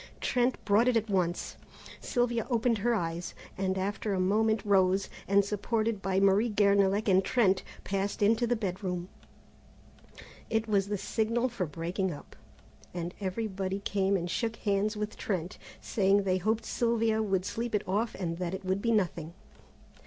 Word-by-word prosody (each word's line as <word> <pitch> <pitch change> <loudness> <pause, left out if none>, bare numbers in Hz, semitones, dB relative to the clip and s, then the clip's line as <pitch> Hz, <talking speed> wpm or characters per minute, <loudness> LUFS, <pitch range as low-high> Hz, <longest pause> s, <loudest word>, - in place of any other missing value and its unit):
Trent 250 0 +1
brought 210 +4 +4
it 250 -2 +4
at 220 -1 -2
once. 180 -2 -1 0.4
Sylvia 240 -2 0
opened 235 -2 +1
her 235 +3 +2
eyes, 170 -3 -3 0.2
and 190 0 -1
after 200 +1 -2
a - - -1
moment 215 +3 +2
rose, 190 -1 +3 0.2
and 200 0 +4
supported 215 +1 -1
by 190 0 +1
Marie 195 +4 +4
Guernalec 200 0 +3
and 190 -1 +4
Trent, 195 -6 +2 0.2
passed 200 +1 -1
into 225 +3 +3
the 240 - +2
bedroom. 185 -3 -3 1.4
It 225 0 0
was 200 -2 +2
the 205 0 -1
signal 230 +5 0
for 215 -7 -3
breaking 175 +4 -2
up, 145 - -10 0.6
and 175 0 -4
everybody 195 -1 -2
came 200 -1 0
and 175 -1 -3
shook 225 +6 -2
hands 210 0 0
with 210 0 -4
Trent, 185 -1 -3 0.2
saying 200 -1 +2
they 185 -1 +1
hoped 220 +4 0
Sylvia 230 -2 +1
would 190 -3 0
sleep 230 +1 -2
it 200 - -2
off 215 +5 0
and 170 -2 -3
that 180 0 -2
it 190 - -8
would 190 +1 0
be 230 - +1
nothing. 170 -6 -1
200 Hz, 160 wpm, -30 LUFS, 190-220 Hz, 1.4 s, brought